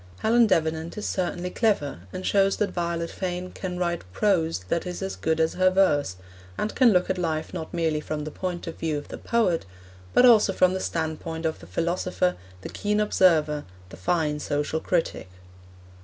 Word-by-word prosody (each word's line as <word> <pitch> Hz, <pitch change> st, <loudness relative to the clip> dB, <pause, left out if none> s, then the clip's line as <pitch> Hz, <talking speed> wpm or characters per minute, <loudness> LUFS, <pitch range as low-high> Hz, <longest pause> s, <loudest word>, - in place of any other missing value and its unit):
Helen 230 Hz, +1 st, +4 dB
Davenant 160 Hz, -1 st, 0 dB
is 210 Hz, -, -4 dB
certainly 180 Hz, -1 st, -2 dB
clever, 195 Hz, -, 0 dB
and 185 Hz, -, -6 dB
shows 195 Hz, -1 st, +3 dB
that 210 Hz, -, 0 dB
Violet 170 Hz, -1 st, -2 dB
Fane 180 Hz, -1 st, -4 dB
can 180 Hz, -2 st, -5 dB
write 170 Hz, -1 st, -1 dB
prose 165 Hz, -, +1 dB
that 170 Hz, -, -1 dB
is 180 Hz, +2 st, -5 dB
as 190 Hz, -, -3 dB
good 160 Hz, 0 st, -1 dB
as 160 Hz, 0 st, +2 dB
her 185 Hz, 0 st, +4 dB
verse, 150 Hz, -, +2 dB, 0.4 s
and 210 Hz, -, -2 dB
can 250 Hz, -3 st, +5 dB
look 180 Hz, -2 st, +3 dB
at 185 Hz, -, -2 dB
life 160 Hz, -2 st, -2 dB
not 160 Hz, -, -5 dB
merely 160 Hz, -3 st, 0 dB
from 150 Hz, 0 st, -4 dB
the 155 Hz, -, -5 dB
point 180 Hz, 0 st, -4 dB
of 165 Hz, -, -7 dB
view 155 Hz, -2 st, -1 dB
of 145 Hz, -, -8 dB
the -, -, -7 dB
poet, 220 Hz, -8 st, +1 dB, 0.5 s
but 250 Hz, -, +6 dB
also 220 Hz, -5 st, +6 dB
from 185 Hz, 0 st, +3 dB
the 190 Hz, -, -2 dB
standpoint 160 Hz, -1 st, -3 dB
of 160 Hz, -, -1 dB
the 80 Hz, -, -13 dB
philosopher, 180 Hz, -, 0 dB, 0.3 s
the -, -, -7 dB
keen 210 Hz, 0 st, -1 dB
observer, 160 Hz, -8 st, +3 dB, 0.3 s
the -, -, -10 dB
fine 150 Hz, -, 0 dB
social 145 Hz, +2 st, -1 dB
critic. 165 Hz, -, -1 dB
175 Hz, 185 wpm, -25 LUFS, 160-185 Hz, 0.5 s, but